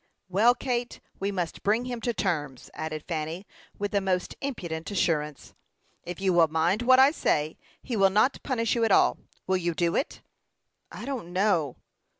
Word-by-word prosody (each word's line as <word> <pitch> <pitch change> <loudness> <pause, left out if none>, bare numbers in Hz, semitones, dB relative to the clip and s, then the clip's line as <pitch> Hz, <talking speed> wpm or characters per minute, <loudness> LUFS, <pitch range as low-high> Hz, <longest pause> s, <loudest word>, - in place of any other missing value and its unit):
"Well, 220 +7 +4
Kate, 245 -1 -3 0.2
we 200 +1 -1
must 180 -4 -3
bring 220 +4 +1
him 245 -2 -4
to 240 - 0
terms," 150 - -3
added 155 -1 -5
Fanny, 165 +3 -3 0.3
with 205 0 -2
the 200 - +1
most 185 -2 -1
impudent 170 -12 -4
assurance. 150 -7 -1 0.5
"If 175 0 -6
you 190 -1 +2
will 170 -2 +5
mind 165 +7 +1
what 255 +1 +6
I 265 +2 +7
say, 155 - 0 0.3
he 245 - -3
will 195 -2 +5
not 215 +7 +2
punish 230 -4 0
you 235 - +1
at 225 - +2
all. - - +4 0.3
Will 190 0 +2
you 170 -2 -2
do 170 +1 +1
it?" 285 - -2 0.7
"I - - -8
don't 255 -11 -5
know." 180 -8 +1
190 Hz, 175 wpm, -27 LUFS, 165-230 Hz, 0.7 s, I